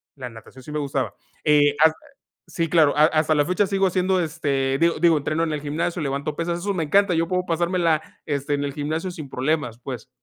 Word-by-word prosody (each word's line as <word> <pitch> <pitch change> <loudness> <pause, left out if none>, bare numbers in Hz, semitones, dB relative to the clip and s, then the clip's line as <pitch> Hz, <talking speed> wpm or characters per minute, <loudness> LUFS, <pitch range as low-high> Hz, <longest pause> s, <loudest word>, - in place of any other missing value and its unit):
La 130 -3 -7
natación 115 +3 -14
sí 150 - -9
me 150 - -2
gustaba. 140 -2 -2 0.3
Eh, 145 -1 +4
ah 160 - +7 0.6
sí, 165 -1 -2
claro, 155 -3 +4
has 155 +1 +6
hasta 155 0 +2
la 145 -1 +3
fecha 185 +5 +1
sigo 195 -1 +2
haciendo, 185 0 +1
este, 140 -5 -1
digo, 170 0 +2
digo, 165 -1 +4
entreno 155 +3 -1
en 165 - -1
el 150 - -3
gimnasio, 160 +4 -2
levanto 140 +1 -2
pesas, 170 +1 -2
eso 200 +3 -2
me 175 -4 -1
encanta, 195 +5 +3
yo 165 0 +1
puedo 180 +1 -1
pasármela, 170 -2 +1 0.2
este, 145 0 -2
en 145 0 -1
el 140 - -2
gimnasio 155 +5 -3
sin 155 -5 -8
problemas, 130 -3 -1
pues, 125 -2 -7
155 Hz, 215 wpm, -23 LUFS, 145-170 Hz, 0.6 s, ah